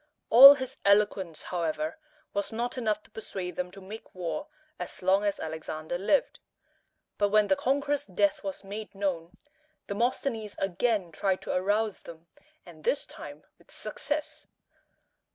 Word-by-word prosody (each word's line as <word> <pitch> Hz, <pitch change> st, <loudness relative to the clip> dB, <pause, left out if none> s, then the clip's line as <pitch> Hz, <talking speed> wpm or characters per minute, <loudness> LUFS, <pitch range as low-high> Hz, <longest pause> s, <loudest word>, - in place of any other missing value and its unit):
All 275 Hz, +5 st, +12 dB
his 260 Hz, -2 st, -6 dB
eloquence, 200 Hz, -5 st, +2 dB
however, 160 Hz, -, -2 dB, 0.3 s
was 200 Hz, 0 st, -1 dB
not 235 Hz, +2 st, -2 dB
enough 215 Hz, -4 st, -1 dB
to -, -, -19 dB
persuade 190 Hz, -4 st, -6 dB
them 180 Hz, 0 st, -3 dB
to 195 Hz, +2 st, -12 dB
make 200 Hz, +3 st, -11 dB
war 185 Hz, -, -4 dB, 0.3 s
as -, -, -6 dB
long 190 Hz, +2 st, +4 dB
as 205 Hz, -1 st, 0 dB
Alexander 160 Hz, +1 st, -5 dB
lived. 240 Hz, +9 st, +1 dB, 0.8 s
But 205 Hz, -1 st, +3 dB
when 210 Hz, 0 st, +4 dB
the 190 Hz, -, +5 dB
conqueror's 280 Hz, +4 st, 0 dB
death 200 Hz, +1 st, +1 dB
was 195 Hz, 0 st, -5 dB
made 205 Hz, +1 st, -7 dB
known, 180 Hz, -4 st, -3 dB, 0.5 s
Demosthenes 225 Hz, 0 st, -2 dB
again 195 Hz, -1 st, 0 dB
tried 190 Hz, +3 st, -1 dB
to -, -, -3 dB
arouse 205 Hz, +3 st, 0 dB
them, 165 Hz, 0 st, -12 dB, 0.4 s
and 165 Hz, -3 st, -14 dB
this 290 Hz, -, +1 dB
time -, -, -10 dB, 0.2 s
with -, -, -25 dB
success. 295 Hz, 0 st, -5 dB
200 Hz, 145 wpm, -28 LUFS, 180-220 Hz, 0.8 s, All